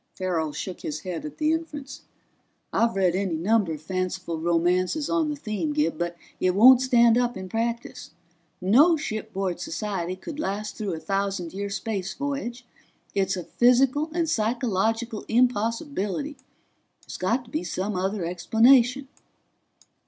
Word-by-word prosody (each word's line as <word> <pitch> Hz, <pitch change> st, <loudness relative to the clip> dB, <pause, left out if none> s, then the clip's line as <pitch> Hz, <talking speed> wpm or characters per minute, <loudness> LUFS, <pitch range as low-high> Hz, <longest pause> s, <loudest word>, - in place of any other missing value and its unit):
Farrell 170 Hz, -5 st, -1 dB
shook 180 Hz, +4 st, -6 dB
his 150 Hz, 0 st, -4 dB
head 175 Hz, -4 st, -5 dB
at 150 Hz, -, -8 dB
the 310 Hz, 0 st, +2 dB
inference. 295 Hz, -4 st, -5 dB, 0.7 s
"I've 230 Hz, -1 st, +2 dB
read 185 Hz, -3 st, +2 dB
any 190 Hz, -2 st, -1 dB
number 195 Hz, +2 st, +2 dB
of 155 Hz, 0 st, -8 dB
fanciful 185 Hz, -1 st, -3 dB
romances 180 Hz, -, +1 dB
on 325 Hz, -2 st, +1 dB
the 295 Hz, -, -2 dB
theme, 280 Hz, +3 st, -3 dB
Gib, 300 Hz, -, 0 dB
but 175 Hz, 0 st, -2 dB, 0.2 s
it 185 Hz, 0 st, +1 dB
won't 250 Hz, +5 st, +8 dB
stand 235 Hz, -2 st, +5 dB
up 245 Hz, -2 st, 0 dB
in 190 Hz, 0 st, -6 dB
practice. 230 Hz, +4 st, -3 dB, 0.5 s
No 280 Hz, -, +5 dB
shipboard 215 Hz, -, -3 dB
society 185 Hz, -1 st, -3 dB
could 295 Hz, -, -8 dB
last 210 Hz, -4 st, -3 dB
through 205 Hz, -4 st, -3 dB
a -, -, -6 dB
thousand 195 Hz, -2 st, -2 dB
year 200 Hz, +1 st, -3 dB
space 195 Hz, -2 st, -3 dB
voyage. 270 Hz, -4 st, -4 dB, 0.5 s
It's 195 Hz, -1 st, 0 dB
a 180 Hz, -, -4 dB
physical 260 Hz, -, +3 dB
and 335 Hz, 0 st, 0 dB
psychological 225 Hz, -2 st, 0 dB
impossibility. 235 Hz, -, 0 dB, 0.7 s
There's -, -, -8 dB
got 230 Hz, +8 st, 0 dB
to 235 Hz, -, -17 dB
be 310 Hz, -, -2 dB
some 195 Hz, +2 st, -3 dB
other 190 Hz, 0 st, -1 dB
explanation." 240 Hz, +9 st, +4 dB
215 Hz, 145 wpm, -25 LUFS, 185-250 Hz, 0.7 s, won't